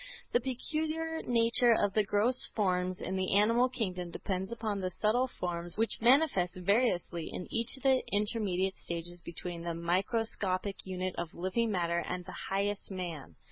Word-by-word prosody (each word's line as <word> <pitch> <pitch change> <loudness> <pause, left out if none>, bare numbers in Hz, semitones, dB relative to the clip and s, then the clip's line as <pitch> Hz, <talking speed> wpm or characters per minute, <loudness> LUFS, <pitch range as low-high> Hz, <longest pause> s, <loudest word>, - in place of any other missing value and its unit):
The 240 - +4
peculiar 315 +5 -2
nature 235 0 +4
of 205 -1 +1
the 215 - +3
gross 215 +6 +2
forms 185 -3 0
in 190 - -2
the 190 +1 +1
animal 230 +5 +4
kingdom 185 -8 -3
depends 190 +3 -3
upon 220 -3 -2
the 185 - -1
subtle 220 +7 +2
forms 175 -6 -4
which 225 +1 +1
manifest 235 - +4
variously 185 -3 +1
in 180 - -5
each 230 +4 +1
of 265 - -15
the 265 -1 +4
intermediate 200 -3 0
stages 170 +1 -5
between 170 0 -6
the 170 -1 -3
microscopic 190 +2 -1
unit 185 0 -2
of 170 -1 -5
living 190 +6 0
matter 170 -4 +1
and 180 +1 -4
the 185 - -8
highest 200 +1 -1
man. 170 - -6
195 Hz, 160 wpm, -32 LUFS, 180-230 Hz, -, The